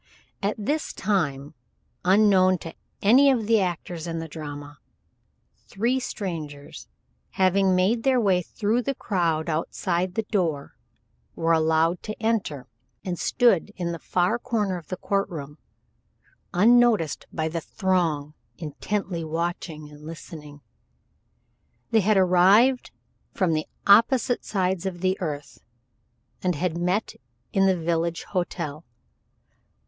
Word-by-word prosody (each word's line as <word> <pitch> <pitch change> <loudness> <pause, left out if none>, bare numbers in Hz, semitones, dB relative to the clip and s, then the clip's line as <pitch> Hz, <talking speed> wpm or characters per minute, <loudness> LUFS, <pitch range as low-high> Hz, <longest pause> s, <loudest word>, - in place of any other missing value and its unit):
At 200 +1 0
this 290 +9 -2
time, 150 -8 -1 0.5
unknown 185 -1 +5
to 165 - -6 0.3
any 260 +7 +6
of 240 -5 +1
the 225 0 +4
actors 175 -2 -3
in 165 -1 -3
the 165 0 -4
drama, 145 -1 -8 0.9
three 240 +6 0
strangers, 160 - -6 0.5
having 190 0 +3
made 200 +6 +2
their 260 0 +3
way 190 -5 +3
through 215 +6 -1
the 275 +3 -2
crowd 170 -8 -1
outside 175 +3 -1
the 225 - 0
door, 165 -9 -1 0.6
were 165 0 0
allowed 160 +2 +2
to 215 - -7
enter, 215 - -1 0.4
and 180 -2 -3
stood 235 -9 +3
together 210 - -18
in 175 -2 -2
the 170 - -5
far 180 +9 0
corner 210 -7 -1
of 160 - -18
the 185 - -4
court 200 +2 -1
room 150 -2 -8 0.9
unnoticed 220 -4 +3
by 160 -1 -2
the 165 +1 -3
throng, 165 -7 -1 0.2
intently 170 +3 -3
watching 160 -1 -4
and 150 0 -14
listening. 150 -2 -10 1.3
They 225 - +5
had 210 +1 +3
arrived 195 +8 +4 0.5
from 180 -4 +1
the 155 0 -1 0.2
opposite 235 +4 +4
sides 190 -2 -1
of 175 -2 -5
the 185 0 +2
earth, 145 -6 -5 0.8
and 180 -2 0
had 170 +2 -1
met 180 +5 -1 0.4
at 195 0 +3
the 190 -1 +3
village 165 0 -1
hotel. 170 -5 -4
180 Hz, 130 wpm, -25 LUFS, 160-205 Hz, 1.3 s, any